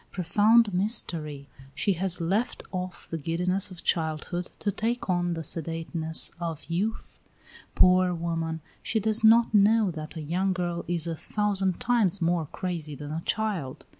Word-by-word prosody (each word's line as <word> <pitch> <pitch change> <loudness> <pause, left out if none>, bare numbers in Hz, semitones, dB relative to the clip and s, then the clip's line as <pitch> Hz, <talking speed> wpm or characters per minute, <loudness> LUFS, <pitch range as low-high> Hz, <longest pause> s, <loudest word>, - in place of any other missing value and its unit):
Profound 205 +4 +4
mystery! 165 - -2 0.3
She 200 - +1
has 180 0 0
left 195 +9 -1
off 185 -1 -5
the 165 - -4
giddiness 180 +6 -1
of 175 -3 -11
childhood 165 +2 -1
to 205 - -1
take 225 0 -1
on 175 -1 +1
the 165 - -4
sedateness 165 +1 -2
of 165 -3 -4
youth. 195 +7 -3 0.6
Poor 185 0 +5
woman! 165 -1 -2 0.2
she 220 +2 0
does 220 +1 0
not 225 +1 +6
know 210 0 +5
that 155 0 -7
a 160 - -5
young 185 +5 0
girl 175 -1 -2
is 175 -2 0
a 165 -1 -2
thousand 195 0 -1
times 220 -6 +2
more 170 -2 +1
crazy 165 -5 -4
than 145 +1 -7
a 160 +1 -3
child. 200 -12 -2
180 Hz, 155 wpm, -27 LUFS, 165-205 Hz, 0.6 s, not